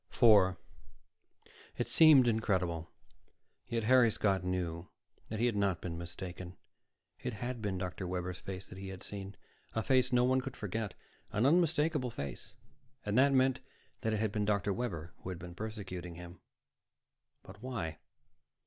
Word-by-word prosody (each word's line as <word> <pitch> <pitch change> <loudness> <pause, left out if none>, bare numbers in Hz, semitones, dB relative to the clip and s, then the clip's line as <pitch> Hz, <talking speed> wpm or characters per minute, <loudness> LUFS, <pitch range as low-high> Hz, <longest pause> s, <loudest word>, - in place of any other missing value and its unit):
4 100 -6 +6 1.2
It - - -1
seemed 150 -6 +7
incredible, 95 -7 0 0.8
yet 115 -2 -1
Harry 125 +1 +6
Scott 100 -3 +1
knew 90 -2 -2 0.4
he 110 +2 0
had 120 -3 +1
not 100 -4 +1
been 85 -1 -5
mistaken. 90 +1 -7 0.6
It 125 - -4
had 120 +3 -4
been 100 -3 -1
Dr. 90 0 -4
Webber's 90 0 -3
face 95 -1 -7
he 95 +1 -8
had 95 -1 -8
seen, 100 -1 -7 0.4
a 110 - 0
face 130 0 +3
no 125 0 +4
one 130 +1 +3
could 130 0 -7
forget, 105 0 -3 0.4
an 105 +4 +1
unmistakable 155 -3 +3
face. 70 - -7 0.5
And 105 0 -1
that 140 +1 +6
meant 130 -1 +3 0.4
that 110 -3 -1
it 110 - 0
had 110 -1 0
been 105 0 0
Dr. 100 -1 +1
Webber 85 -9 -4
who - - -8
had 90 - -4
been 90 0 -9
persecuting 95 -4 -6
him. 85 0 -10 1.0
But 100 +3 -13
why? 105 - -4
100 Hz, 150 wpm, -33 LUFS, 90-120 Hz, 1.2 s, seemed